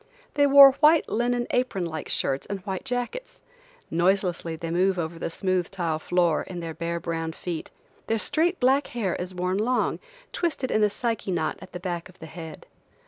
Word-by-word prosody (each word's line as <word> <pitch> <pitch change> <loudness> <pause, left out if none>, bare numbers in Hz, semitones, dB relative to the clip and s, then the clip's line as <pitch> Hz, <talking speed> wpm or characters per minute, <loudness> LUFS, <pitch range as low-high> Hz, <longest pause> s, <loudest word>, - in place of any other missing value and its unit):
They 285 -1 +4
wore 280 0 +10
white 305 +4 +4
linen 240 +1 0
apron 245 -8 0
like 160 -2 -5
skirts 135 0 -1
and 200 -1 -4
white 190 0 -4
jackets. 270 - -4 0.5
Noiselessly 175 -1 +1
they 165 +1 -5
move 185 +2 +2
over 165 0 -3
the - - -3
smooth 185 0 -1
tile 170 -5 -2
floor, 175 -1 +1
in 180 -2 -7
their 165 -1 -5
bare, 170 +1 -3
brown 165 -1 -3
feet. 170 -1 -5 0.4
Their 225 - +1
straight 325 - +1
black 270 +3 +3
hair 195 -7 0
is 180 +1 -6
worn 180 +2 -1
long, 245 +4 +1 0.3
twisted 305 -7 -1
in 215 - +3
a 210 - +4
Psyche 225 -1 -3
knot 165 -4 -1
at - - -11
the 180 - -6
back 175 -1 -4
of 185 - -18
the - - -10
head. 160 0 -9
185 Hz, 190 wpm, -26 LUFS, 170-245 Hz, 0.5 s, wore